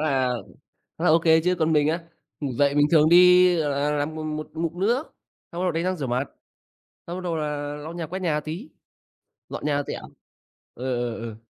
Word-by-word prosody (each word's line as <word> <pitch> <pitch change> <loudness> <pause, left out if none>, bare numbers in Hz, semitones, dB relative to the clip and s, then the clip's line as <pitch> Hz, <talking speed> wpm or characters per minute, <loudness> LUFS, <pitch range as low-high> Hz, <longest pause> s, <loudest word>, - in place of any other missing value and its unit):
là 135 -4 +1 0.7
khá 165 - -5
là 180 - +4
ô 160 +2 +5
kê 160 -1 +4
chứ! 180 +2 +1
Còn 160 0 +2
mình 150 -1 +3
á, 165 +2 -1 0.4
ngủ 140 -3 -3
dậy 140 +3 +2
mình 145 0 +4
thường 155 -2 +5
đi, 180 +1 +7
gọi 150 -2 0
là, 140 +1 0
làm 150 +1 -2
mô 155 - -5
1 155 0 -4
ngụm 165 +1 -3
nước, 240 +9 +1 0.5
xong 170 - -5
bắt - - 0
đầu 180 - +1
đánh 165 +1 -2
răng 185 +1 0
rửa 140 -4 -3
mặt, 125 +3 -1 0.8
xong 175 +1 -5
bắt 185 - -6
đầu 170 -2 -2
là 145 -1 -3
lau 150 +3 -8
nhà, 170 -2 -5
quét 185 +4 -5
nhà 160 -4 0
tí, 160 - -7 0.8
dọn - - -6
nhà 145 -1 +1
tẹo. - - -5 0.7
Ờ, 125 - -9 0.3
ờ, - - -7
ờ. 115 -2 -6
155 Hz, 225 wpm, -24 LUFS, 145-175 Hz, 0.8 s, đi